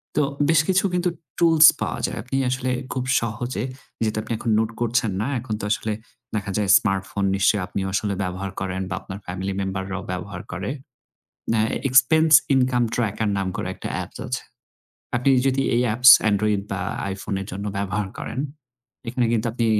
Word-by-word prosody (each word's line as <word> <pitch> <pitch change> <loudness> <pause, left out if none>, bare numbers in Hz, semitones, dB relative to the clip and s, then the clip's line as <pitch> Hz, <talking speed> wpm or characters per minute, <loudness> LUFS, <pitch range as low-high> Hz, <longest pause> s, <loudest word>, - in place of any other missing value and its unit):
তো 150 - +3 0.3
বেশ 160 -2 +5
কিছু 190 0 +3
কিন্তু 180 0 +1 0.3
টুলস 165 -2 +7
পাওয়া - - -2
যায়। - - -4
আপনি 130 +1 -5
আসলে 130 0 -1 0.2
খুব 130 - -2 0.2
সহজে 115 0 -3 0.4
যেহেতু 110 -1 -1
আপনি 115 - -4 0.2
নোট 110 0 +1
করছেন 120 -2 +1
না। 110 - -1
এখন 115 -2 -5
তো - - -3
আসলে 110 0 -1 0.4
দেখা 100 -2 -2
যায় 105 -2 0
স্মার্টফোন 95 -1 -2
নিশ্চয়ই 100 +1 +2
আপনি - - -4
আসলে 100 0 0
ব্যবহার 95 +1 -4
করেন 95 -1 -3
বা - - -2
আপনার 100 0 -8
ফ্যামিলি 95 +2 -4
মেম্বাররাও 95 0 -4
ব্যবহার 90 +3 -5
করে। 95 +4 -4 0.8
অ্যা 115 -1 +2 0.3
এক্সপেন্স 155 +5 +5 0.2
ইনকাম 125 -2 +3
ট্র্যাকার 110 -2 0
নাম 95 -1 -1
করে - - -3
একটা - - -6
অ্যাপ - - -4 0.2
আছে। - - -3 0.7
আপনি 125 +3 +2 0.2
যদি 135 0 +2
এই 120 - +3
অ্যাপস 125 +4 +7 0.2
Android 105 0 +1
বা - - -2 0.3
iphone 100 0 -4
এর 95 - -6
জন্য 100 +2 -5
ব্যবহার 100 +1 -1
করেন, - - -5 0.7
এখানে 125 0 +1
কিন্তু 115 0 0
আপনি 115 0 0
110 Hz, 170 wpm, -23 LUFS, 100-125 Hz, 0.8 s, টুলস